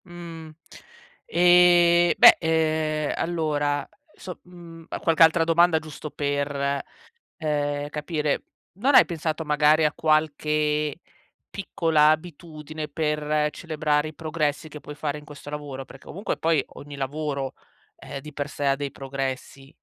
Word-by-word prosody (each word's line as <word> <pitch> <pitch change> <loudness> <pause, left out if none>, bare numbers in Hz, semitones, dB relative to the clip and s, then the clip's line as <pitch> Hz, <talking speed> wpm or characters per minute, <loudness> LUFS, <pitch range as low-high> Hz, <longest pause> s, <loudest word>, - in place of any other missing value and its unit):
Mhmm, 170 -2 -10 0.8
e 175 0 +5
beh, - - +9
ehm, 155 -2 0
allora, 150 -4 -1 0.3
so 180 -2 -9
mhmm, 170 -2 -13
qualche 165 -1 +4
altra 165 +1 +5
domanda 165 0 +4
giusto 155 0 -9
per, 140 -1 -2 0.6
ehm, 145 -2 -2
capire; 150 0 -2 0.3
non 255 +9 +1
hai - - +9
pensato, 160 -2 -3
magari, 150 +1 +3
a 150 - +2
qualche 150 -1 0 0.5
piccola 165 -5 +1
abitudine 155 -1 -5
per 150 0 0
celebrare 155 -2 -1
i 155 - -11
progressi 155 -1 -2
che 150 0 -10
puoi 150 - -9
fare 150 0 -3
in 150 - -13
questo 145 -1 -11
lavoro? 145 -3 -6
Perché 135 - -15
comunque 195 +6 -4
poi 160 -3 +1
ogni 145 0 -10
lavoro, 140 0 -3 0.4
eh, 140 0 -8
di 150 +2 -11
per 145 0 -4
sé 145 -1 -4
ha 135 0 +3
dei 140 0 -4
progressi, 135 0 -5
150 Hz, 135 wpm, -24 LUFS, 145-165 Hz, 0.8 s, beh